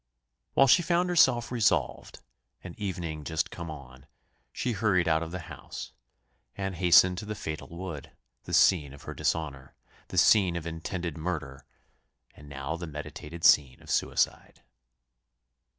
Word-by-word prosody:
While 135 - +6
she 135 +7 +6
found 175 +1 +1
herself 130 -10 +3
resolved, 105 - 0 0.4
and 90 - -8
evening 85 -6 -4
just 80 +1 -2
come 85 -1 -7
on, 70 -3 -11 0.4
she 125 - -2
hurried 95 -5 +1
out 80 0 +2
of 85 - -4
the 90 +1 -6
house, - - -9 0.7
and 95 -1 -3
hastened 90 +1 +5
to 105 - -7
the 105 0 -5
fatal 80 -5 -6
wood; 85 -4 -7 0.4
the - - -7
scene 75 -7 +4
of 70 - -13
her - - -7
dishonour 70 -5 -3 0.3
the - - -7
scene 95 -5 +5
of 85 -2 -4
intended 85 0 -5
murder 75 -5 -5 0.7
and 75 -1 -14
now 70 +3 -4
the 85 0 -6
meditated 75 +2 -8
scene 65 -4 +5
of - - -9
suicide. - - -1
85 Hz, 150 wpm, -28 LUFS, 75-95 Hz, 0.7 s, While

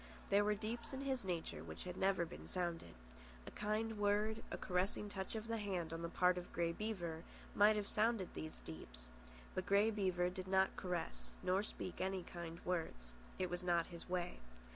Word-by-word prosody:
There 200 +1 +6
were 210 0 +3
deeps 225 +4 -3
in 265 - -2
his 265 -3 0
nature 165 - -2
which 80 -1 -6
had 180 -1 -4
never 190 -3 +3
been 170 - -9
sounded. 170 - -2 0.5
A - - -7
kind 215 +1 0
word, 210 +2 +3
a - - -2
caressing 185 +3 0
touch 190 +1 -3
of 220 +1 -3
the 230 0 0
hand, 180 -6 -1
on 165 - -3
the 170 - -2
part 180 +1 +4
of 180 - -9
Grey 170 0 +1
Beaver, 170 -5 -3 0.3
might 210 +1 +7
have 205 -1 -1
sounded 215 -3 +2
these 155 - -6
deeps; 60 -6 -8 0.4
but 185 - -2
Grey 205 +3 +5
Beaver 185 -4 +2
did 185 0 -5
not 190 0 +4
caress, 180 -3 -3
nor 185 +2 +3
speak 185 -3 -4
kind 175 -3 -3
words. 160 - -2 0.2
It 185 -1 0
was 175 +1 -1
not 170 -2 +3
his 170 +1 -8
way. 180 -1 -1
185 Hz, 185 wpm, -40 LUFS, 170-210 Hz, 0.5 s, might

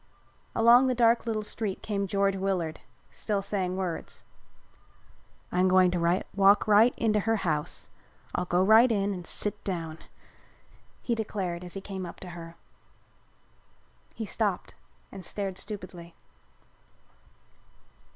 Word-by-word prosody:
Along 240 +3 +6
the 255 - +1
dark 235 0 +3
little 215 -2 -1
street 210 -2 -4
came 200 -2 -2
George 195 0 +1
Willard, 185 -4 -2 0.3
still 205 -2 -2
saying 190 -2 -2
words. 180 -4 -5 1.3
"I'm 180 +1 +2
going 185 -1 +5
to 175 +1 +1
walk 200 +1 +5
right 215 +3 +6
into 215 -2 +2
her 225 +2 +1
house. 150 -3 -1 0.5
I'll - - -1
go 180 +1 +2
right 220 +5 +6
in 200 -2 0
and 180 -2 -7
sit 210 - -1
down," 165 -4 -4 1.0
he 240 - 0
declared 195 -6 -3
as 180 +1 -8
he 195 - -5
came 190 -2 -6
up - - -10
to 185 - -8
her. 170 -1 -9 1.6
He 225 - -4
stopped 205 -2 -2 0.4
and 195 -2 -9
stared 195 +1 -4
stupidly. 180 -5 -8
195 Hz, 130 wpm, -28 LUFS, 180-215 Hz, 1.6 s, Along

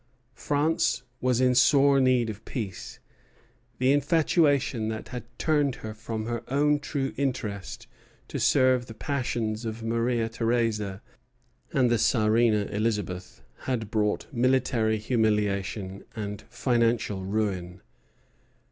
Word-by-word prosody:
France 145 -5 0 0.2
was 125 -1 +2
in 130 -1 +4
sore 135 +2 +5
need 130 -2 +3
of 110 +1 -11
peace. 105 -8 -6 0.8
The 130 +1 +3
infatuation 145 -6 +2
that 110 0 -5
had 125 -2 -6
turned 145 -4 +1
her 110 - -5
from 110 0 -5
her 115 0 -3
own 145 +1 +3
true 140 -2 -3
interest 120 -8 -3 0.4
to - - -4
serve 130 -2 +3
the 115 - -9
passions 120 -5 -2
of 115 0 -5
Maria 115 0 0
Theresa 115 -3 -1 0.7
and 125 -3 +2
the 120 - +2
Czarina 110 -1 +3
Elizabeth 105 -4 -3 0.2
had 115 -5 -2
brought 105 -1 0
military 120 -3 +2
humiliation 105 -3 -1
and 105 -1 -5
financial 115 -4 0
ruin. 95 -3 -2
115 Hz, 115 wpm, -27 LUFS, 110-130 Hz, 0.8 s, sore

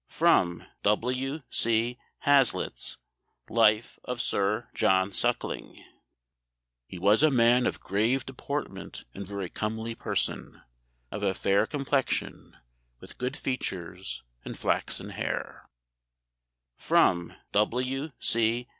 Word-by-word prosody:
[Sidenote: 85 -1 +3 0.2
W. 130 +7 0
C. 115 +2 +1 0.2
Hazlitt's 135 - +2 0.5
Life 110 0 +3
of 125 -1 -4
Sir 105 0 0
John 95 +1 +2
Suckling.] - - -2 1.0
"He 95 - -8
was 100 +7 +4
a 155 - +6
man 125 -1 +4
of - - -2
grave 115 +7 +1
deportment 135 -6 -5
and 100 -1 -7
very 100 -2 -4
comely 110 +4 -3
person: - - -3 0.5
of - - -4
a 95 - +1
fair 100 +3 +2
complexion, 140 -1 -1 0.4
with - - -13
good 125 +3 -2
features 95 -7 -4 0.2
and - - -7
flaxen - - -1
haire." - - -4 1.1
[Sidenote: 85 -1 +3 0.2
W. 130 +7 0
C. 115 +2 +1
115 Hz, 105 wpm, -28 LUFS, 100-130 Hz, 1.1 s, a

